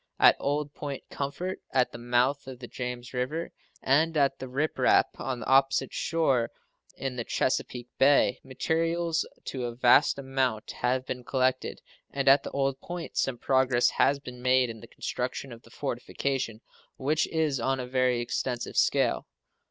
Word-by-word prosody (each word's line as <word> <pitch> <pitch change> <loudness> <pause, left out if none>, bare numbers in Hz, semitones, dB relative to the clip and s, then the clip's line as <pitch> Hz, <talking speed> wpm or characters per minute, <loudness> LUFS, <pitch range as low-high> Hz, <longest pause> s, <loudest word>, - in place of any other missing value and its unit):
At - - +7
Old 145 +1 -1
Point 140 -2 -6
Comfort, 175 +7 -3
at 125 -1 +2
the 120 - -9
mouth 125 +4 +1
of 130 -1 -7
the 120 0 -9
James 125 0 -6
River, 135 +7 -2 0.3
and 155 +4 +3
at 140 -2 +2
the 130 - -6
Rip 140 +5 -2
Rap, - - +4
on 130 -3 -3
the - - -5
opposite 135 +1 +3
shore 135 -8 +1 0.5
in 130 -2 -4
the 120 - -1
Chesapeake 125 0 -1
Bay, 140 +1 +4
materials 165 +5 0 0.2
to 130 -2 -4
a 120 -1 -4
vast 125 +4 +5
amount 130 -5 -1
have 130 +1 -1
been 125 -1 -5
collected; 130 +1 0 0.3
and 140 -1 -3
at 135 +1 +7
the - - -6
Old 135 -1 -1
Point 175 -1 -6
some 130 -2 0
progress 130 -1 +3
has 140 - +3
been 125 -3 -10
made 125 -1 +3
in 110 - -10
the 115 - -12
construction 125 +3 -4
of 115 - -12
the 115 - -19
fortification, 125 -2 -3 0.4
which 150 +4 +1
is 155 -5 0
on 130 +3 0
a 125 - -3
very 125 -1 +1
extensive 120 +1 -3
scale. - - +2
130 Hz, 165 wpm, -28 LUFS, 125-140 Hz, 0.5 s, At